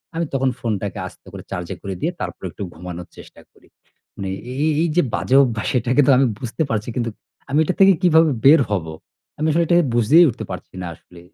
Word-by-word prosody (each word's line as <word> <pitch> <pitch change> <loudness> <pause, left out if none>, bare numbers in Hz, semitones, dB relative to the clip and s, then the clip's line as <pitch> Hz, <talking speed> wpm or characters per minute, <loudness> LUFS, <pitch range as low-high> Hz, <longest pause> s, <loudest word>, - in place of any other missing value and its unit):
আমি 165 +1 -1
তখন 135 -1 +1
ফোনটাকে 105 -5 -3
আস্তে - - -17
করে - - -8
চার্জে 90 -1 -4
করে 95 -1 -5
দিয়ে 165 - 0
তারপরে - - -6
একটু 105 - -7
ঘুমানোর 90 +1 -8
চেষ্টা - - -14
করি। - - -25 0.5
মানে 95 -1 -5 0.2
এই 130 - -5
এই 160 - +2
এই 170 - 0
যে - - +6
বাজে 130 - 0
অভ্যাস, 115 -5 -2
এটাকে 125 +4 +2
তো - - +6
আমি 135 - +4
বুঝতে 125 +6 -2
পারছি, 110 -1 -2
কিন্তু 120 -2 -1 0.4
আমি 145 +3 +2
এটা 170 - -1
থেকে 195 0 +7
কিভাবে 160 -3 +4
বের 145 +2 +8
হব? 95 -5 -1 0.5
আমি 155 - 0
আসলে 170 +3 +2
এটাকে 175 +1 +4
বুঝেই 120 +9 +6
উঠতে 115 -2 -6
পারছি 90 - -8
না 90 - -5
আসলে 85 +2 -18
125 Hz, 210 wpm, -20 LUFS, 100-160 Hz, 0.5 s, বের